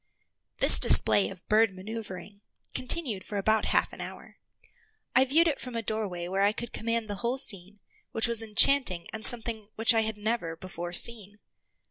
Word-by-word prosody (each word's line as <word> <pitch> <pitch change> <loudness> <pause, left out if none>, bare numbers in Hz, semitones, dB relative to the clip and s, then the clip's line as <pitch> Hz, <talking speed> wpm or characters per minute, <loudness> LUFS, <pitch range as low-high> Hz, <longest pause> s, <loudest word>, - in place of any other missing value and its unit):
This - - +7
display 105 -3 +7
of 185 - -14
bird 220 +1 +1
maneuvring 200 0 -10 0.3
continued 255 - 0
for 205 - -8
about 215 +2 -1
half - - -2
an - - -10
hour. - - -11 0.8
I 260 - +4
viewed 320 +6 +1
it 300 - -3
from 250 -2 -8
a 230 - -5
doorway 195 -5 -6
where 190 +2 -4
I 205 +1 +1
could 235 +2 -8
command 230 0 -4
the 205 -1 -7
whole 240 +4 -4
scene, 200 -4 -7 0.3
which 225 - -1
was 235 -1 -2
enchanting 220 -4 +3
and 220 0 -7
something 225 -3 +3
which 225 +1 +2
I 225 - 0
had 220 -1 -5
never 210 -6 -5
before 175 0 -9
seen. 205 +1 -3
215 Hz, 175 wpm, -25 LUFS, 190-230 Hz, 0.8 s, This